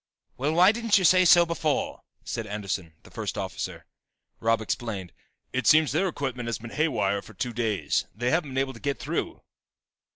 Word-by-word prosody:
"Well, 145 +4 -1
why 180 +4 +6
didn't 230 -2 +2
you 190 - +1
say 185 +1 +6
so 175 0 +7
before!" 160 -3 -1 0.2
said 115 -2 -4
Anderson, 100 -5 -4
the - - -16
first - - -4
officer. - - -5 0.5
Robb 115 0 +2
explained. 105 -4 -4 0.4
"It 130 0 -1
seems 155 -2 +6
their 170 +7 +1
equipment 130 -7 -3
has 115 - -1
been 115 0 -10
haywire 105 -10 0
for 110 - -15
two 120 +5 -3
days, 110 -4 0
they 120 +3 0
haven't 165 -3 +1
been 130 - -5
able 135 0 0
to 115 - -12
get 140 +2 -2
through." - - -4
130 Hz, 185 wpm, -26 LUFS, 110-160 Hz, 0.5 s, so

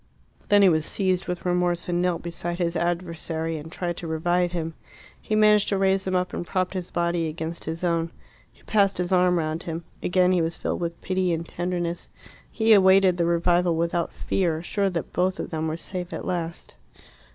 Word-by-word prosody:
Then 205 -1 +6
he 190 - +7
was 155 -2 +2
seized 185 +1 0
with 180 0 -4
remorse, 175 -1 0
and 175 0 0
knelt 180 -2 0
beside 170 0 -4
his 170 -1 -1
adversary 165 -2 -2
and 160 +2 -10
tried 175 -1 -3
to 170 - -6
revive 175 +2 +1
him. 165 -2 -3 0.5
He 215 - -1
managed 210 -1 +5
to 200 - +1
raise 190 0 +2
him 185 - 0
up, 180 0 0
and - - -3
propped 185 +1 -1
his 185 -2 -4
body 170 -1 0
against 160 +1 -5
his 165 +2 -5
own. 170 -1 +1 0.4
He - - -26
passed 200 -2 +2
his 180 +1 -2
arm 180 -1 +4
round 160 0 -2
him. 165 0 -5 0.2
Again 180 0 +3
he 180 -2 +3
was 165 0 -2
filled - - -2
with 170 -1 -3
pity 185 -1 0
and 165 0 -2
tenderness. 175 -1 -3 0.4
He 220 0 +4
awaited 190 -2 +5
the 170 - +2
revival 175 0 +2
without 170 +1 0
fear, 170 -4 -1
sure 200 +2 0
that 170 -4 -4
both 185 +1 0
of - - -5
them 160 -1 -2
were 160 +1 -2
safe 180 +1 -6
at - - -5
last. 170 -2 -4
175 Hz, 200 wpm, -25 LUFS, 165-185 Hz, 0.5 s, he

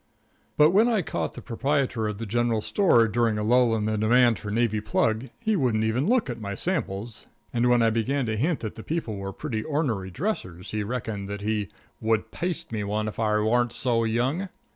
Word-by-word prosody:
But 150 +2 +6
when 210 +5 +5
I 215 -6 +1
caught - - -3
the - - -10
proprietor 130 -2 0
of 105 -1 -4
the 115 - -5
general 115 +1 0
store 120 - +4
during 115 -1 +1
a 105 - -1
lull 120 +1 +4
in 105 -1 -1
the 110 -1 0
demand 120 +1 +4
for 105 - -6
navy 110 0 +1
plug, 110 +3 0
he 220 -2 +1
wouldn't 120 - +1
even 115 +7 0
look 245 0 +2
at 120 -3 -5
my 100 -1 -4
samples, 115 - -3 0.3
and 120 0 +2
when 120 -1 +4
I 115 - +4
began 125 +5 0
to 110 -1 -1
hint 145 +7 0
that 110 -2 -4
the - - -9
people 155 -10 -3
were 100 0 -5
pretty 110 +3 -4
ornery 130 -11 -1
dressers 95 - -4
he 105 - -1
reckoned 105 -3 -4
that 100 0 -5
he 105 -2 -1 0.3
"would 110 0 0
paste 170 -1 -3
me 110 -2 -2
one 105 +1 -1
if 110 - -6
I 105 -1 +2
warn't 120 +2 +2
so 120 -3 +1
young." 130 - 0
115 Hz, 210 wpm, -26 LUFS, 110-130 Hz, 0.3 s, But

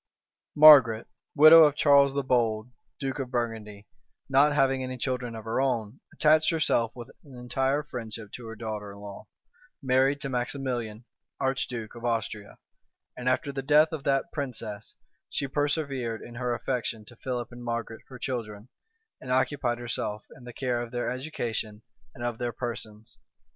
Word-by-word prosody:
Margaret, 135 -7 +8 0.3
widow 155 +2 +10
of 145 -1 +2
Charles 140 -2 +5
the 140 - 0
Bold, 115 -3 0 0.3
duke 135 0 -3
of 130 -2 -3
Burgundy, 110 -4 -4 0.4
not 140 +2 +4
having 135 -2 +2
any 130 0 -4
children 125 -2 -3
of 110 - -7
her 115 +3 0
own, 120 -2 -1
attached 155 +1 +3
herself 140 -8 +1
with 120 -2 -9
an 140 -3 -14
entire 130 +4 -1
friendship 115 -6 -7
to 120 -2 -9
her 115 - -7
daughter 105 -2 -6
in - - -13
law, 100 +1 -10 0.5
married 135 0 +2
to 135 - -2
Maximilian, 125 -3 -3 0.3
archduke 125 -4 -2
of 120 - -11
Austria; 110 -3 -3 0.6
and 125 0 -1
after 135 +2 0
the 135 -1 -4
death 150 +3 +5
of 155 -4 -5
that 135 +4 +1
princess, 110 -7 -5 0.3
she 140 - -2
persevered 140 -5 -2
in 120 - -11
her 125 +1 -2
affection 120 -3 -3
to 120 - -14
Philip 125 -2 -4
and 120 0 -10
Margaret, 115 -1 -4
her 130 - -10
children, 115 -3 -5 0.5
and 130 - -6
occupied 130 -1 +1
herself 110 -3 -3
in 125 - -15
the 120 - -8
care 125 -2 -1
of 120 - -6
their 120 0 -2
education 115 -6 -4 0.3
and 120 - -8
of 120 -2 -3
their 120 -1 -2
persons. 110 -2 -7
125 Hz, 165 wpm, -27 LUFS, 115-135 Hz, 0.6 s, widow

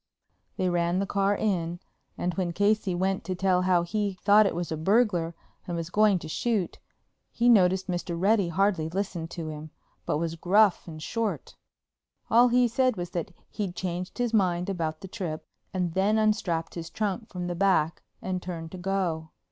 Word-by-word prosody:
They 185 - +1
ran 175 0 +1
the 195 - +1
car 200 +1 +1
in, 175 -5 -1 0.4
and, 180 0 -1
when 175 0 -2
Casey 205 -1 +1
went 190 +2 0
to 185 - -2
tell 185 0 +2
how 180 -2 +3
he 205 +2 -1
thought 205 +1 +6
it - - -2
was 175 -1 -3
a - - 0
burglar 175 -1 +2 0.3
and 175 -1 -3
was 165 +1 -5
going 210 -1 +4
to 165 - -7
shoot, 205 +2 -1 0.5
he 240 - +1
noticed 190 -5 +5
that 185 - -2
Mr. 175 -1 -3
Reddy 200 0 +3
hardly 180 -2 +1
listened 180 -2 -3
to 165 -3 -5
him, 155 0 -7 0.4
but - - +1
was 165 +1 -2
gruff 195 +4 +3
and 155 -2 -8
short. 230 +3 -3 0.8
All 240 +2 +7
he 245 0 +4
said 255 0 +1
was 175 0 -4
that 175 +3 -3 0.2
he'd 195 -4 -3
changed 180 0 -4
his 245 -2 -1
mind 180 -3 +2
about 160 -4 -3
the 190 - -7
trip, 175 -6 -5 0.3
and 180 -3 -1
then 200 +4 +2
unstrapped 210 -7 0
his 165 -1 -6
trunk 215 +1 -3
from 180 -2 -5
the 175 - -2
back 175 -4 +2 0.2
and 185 -1 -2
turned 165 -3 -6
to 185 - -8
go. 175 -4 -1
185 Hz, 190 wpm, -27 LUFS, 170-205 Hz, 0.8 s, All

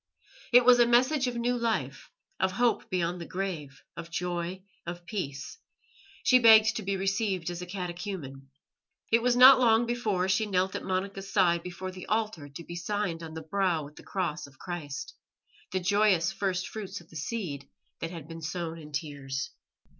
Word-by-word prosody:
It 245 0 +7
was 245 -1 +7
a 240 - +6
message 255 +3 +3
of 245 - -2
new 240 +1 0
life, 210 - -2 0.3
of 190 0 +1
hope 240 +1 +1
beyond 175 -1 -1
the 170 - -7
grave, 175 -8 -5
of 170 0 -8
joy, 175 +1 -3 0.2
of 175 0 -7
peace; 170 - -5 0.6
she 255 - +6
begged 225 -1 +7
to - - -3
be 195 0 -2
received 195 -3 -1
as 175 0 -6
a 180 - -6
catechumen. 175 -7 -6 0.6
It 230 +1 +5
was 245 0 +2
not 255 +1 +10
long 235 -1 +4
before 215 -6 0
she 190 +3 +1
knelt 190 -1 +1
at - - -4
Monica's 195 +1 -3
side 170 -4 +3
before 180 +1 -6
the 185 -1 -10
altar 215 -9 -1
to 140 +4 -9
be 170 - -8
signed 175 -1 -2
on 160 -1 -8
the 160 - -6
brow 175 -1 0
with 150 +1 -13
the - - -12
Cross 170 -6 -3
of 135 -2 -19
Christ 150 -5 -6 0.6
the 185 - 0
joyous 195 -2 +3
first 190 -2 -2
fruits 200 -2 -6
of 170 - -19
the - - -14
seed 155 - -4 0.3
that 165 - -3
had 165 -4 -8
been 165 0 -8
sown 165 0 -4
in 150 -1 -11
tears. 140 -3 -4
185 Hz, 185 wpm, -29 LUFS, 165-215 Hz, 0.6 s, not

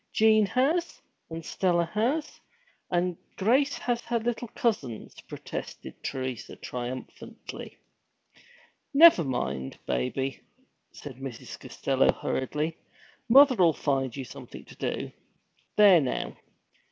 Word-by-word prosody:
Jean 215 -1 +5
has, 310 - 0 0.3
and 165 0 -7
Stella 175 -2 +1
has, 255 +9 -1 0.5
and 180 0 0 0.2
Grace 260 +8 +2
has 240 -1 -1
her 240 0 -1
little 240 +1 -2
cousins!' 215 - -3
protested - - -7
Teresa 130 -2 -4
triumphantly. 125 +1 -7 1.2
'Never 320 - +8
mind, 65 - -3
baby,' 65 - -2 0.5
said 135 -4 -10
Mrs. 135 -3 -8
Costello - - +1
hurriedly. 150 +5 -2 0.5
'Mother'll 250 - +7
find 135 -5 -1
you 135 - -5
something - - -11
to - - -14
do. - - -3 0.6
There 200 -5 +7
now! 130 - -3
175 Hz, 105 wpm, -28 LUFS, -, 1.2 s, Never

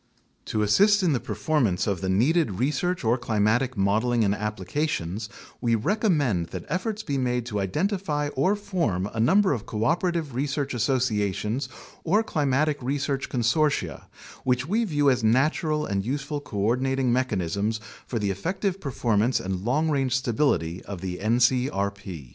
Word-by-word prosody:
To 110 - -1
assist 200 - +4
in 170 -4 +3
the 125 - +1
performance 105 - 0
of 100 -4 -1
the 95 - -2
needed 130 - +2
research 150 - 0
or 120 +2 +2
climatic 115 +2 +1
modeling 110 +4 +2
and 100 -1 +2
applications, 105 - -3 0.3
we 115 -2 +2
recommend 140 - +1
that 90 +1 -7
efforts 215 +3 -2
be 140 -8 -2
made 125 -2 0
to 105 -4 -3
identify 150 - -1
or 150 +9 +1
form 170 - -1
a 110 - -4
number 190 - +4
of 115 -5 -5
cooperative 160 - 0
research 140 +1 -2
associations 120 -1 0 0.3
or 205 +7 +2
cli 155 -9 -1
matic 145 +3 +2
research 140 +1 -2
consortia, 135 +5 0 0.4
which 125 +1 +1
we 225 +6 +1
view 145 -6 +1
as 125 -2 0
natural 150 +6 +2
and 100 -1 -1
useful 145 +4 -3
co 120 -7 -8
ordinating 125 +4 +1
mechanisms 105 -3 0 0.3
for 120 - -3
the 105 -3 0
effective 185 - -2
performance 120 -3 +1
and 95 0 -4
long 150 +7 +1
range 135 -4 +1
stability 110 - 0
of 100 -4 -7
the 90 -1 -4
ncrp. 100 - 0
125 Hz, 150 wpm, -25 LUFS, 105-150 Hz, 0.4 s, assist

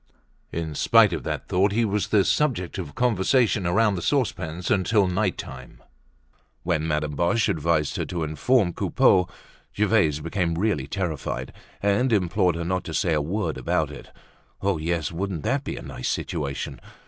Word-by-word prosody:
In 80 -2 -3
spite - - +5
of - - -2
that - - -3
thought, 95 +2 +2
he 115 +2 +2
was 100 -3 -1
the 100 -3 +3
subject 110 - 0
of 75 -6 -6
conversation 115 -3 +2
around 105 +4 +3
the 90 - -3
saucepans 90 - -1
until 100 +1 +3
night 95 +1 0
time. 65 -1 -9 0.8
When 80 -3 0
Madame 75 -1 -1
Boche 90 +8 +2
advised 80 -1 0
her - - -1
to 85 -2 -3
inform 85 - +1
Coupeau, 90 -1 +3 0.5
Gervaise 100 -8 +3
became 85 +1 -1
really 85 -7 0
terrified, 75 -7 -3 0.3
and 100 +6 +2
implored 90 -3 +2
her 85 0 -3
not 95 +1 -1
to 80 - -5
say 90 -6 +1
a 75 - +2
word 100 +8 -2
about - - 0
it. - - -11 0.5
Oh, 95 -4 0
yes, 85 0 -1
wouldn't 90 -2 -3
that 135 +5 0
be - - -5
a - - -7
nice - - -4
situation! 70 -4 -3
90 Hz, 165 wpm, -24 LUFS, 80-105 Hz, 0.8 s, spite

